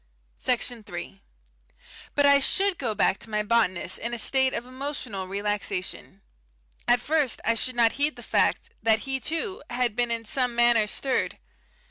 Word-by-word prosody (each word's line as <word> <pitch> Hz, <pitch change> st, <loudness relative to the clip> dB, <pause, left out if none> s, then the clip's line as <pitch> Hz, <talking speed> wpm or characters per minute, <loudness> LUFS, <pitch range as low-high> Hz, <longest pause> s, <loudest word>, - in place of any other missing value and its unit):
Section 245 Hz, -1 st, 0 dB
3 175 Hz, -, -8 dB, 0.9 s
But 285 Hz, -, +4 dB
I 280 Hz, 0 st, +6 dB
should 385 Hz, +6 st, +2 dB
go 230 Hz, -5 st, -2 dB
back 195 Hz, -, +2 dB
to -, -, -4 dB
my 210 Hz, -1 st, 0 dB
botanist 205 Hz, -5 st, +1 dB
in 235 Hz, +1 st, -3 dB
a -, -, -5 dB
state 265 Hz, +3 st, +3 dB
of 235 Hz, -, -3 dB
emotional 255 Hz, -7 st, -5 dB
relaxation. 200 Hz, -1 st, -3 dB, 0.6 s
At 240 Hz, 0 st, +5 dB
first 290 Hz, 0 st, 0 dB
I 230 Hz, -, +3 dB
should 250 Hz, +2 st, -1 dB
not 230 Hz, -1 st, +4 dB
heed 290 Hz, +2 st, 0 dB
the -, -, -11 dB
fact -, -, +1 dB
that 220 Hz, -1 st, +3 dB
he, 270 Hz, 0 st, -2 dB
too, 330 Hz, -, -3 dB
had 240 Hz, -3 st, 0 dB
been 240 Hz, 0 st, +1 dB
in 230 Hz, -1 st, -2 dB
some 250 Hz, +1 st, 0 dB
manner 235 Hz, -2 st, +4 dB
stirred. 265 Hz, +4 st, -1 dB
240 Hz, 165 wpm, -26 LUFS, 215-265 Hz, 0.9 s, I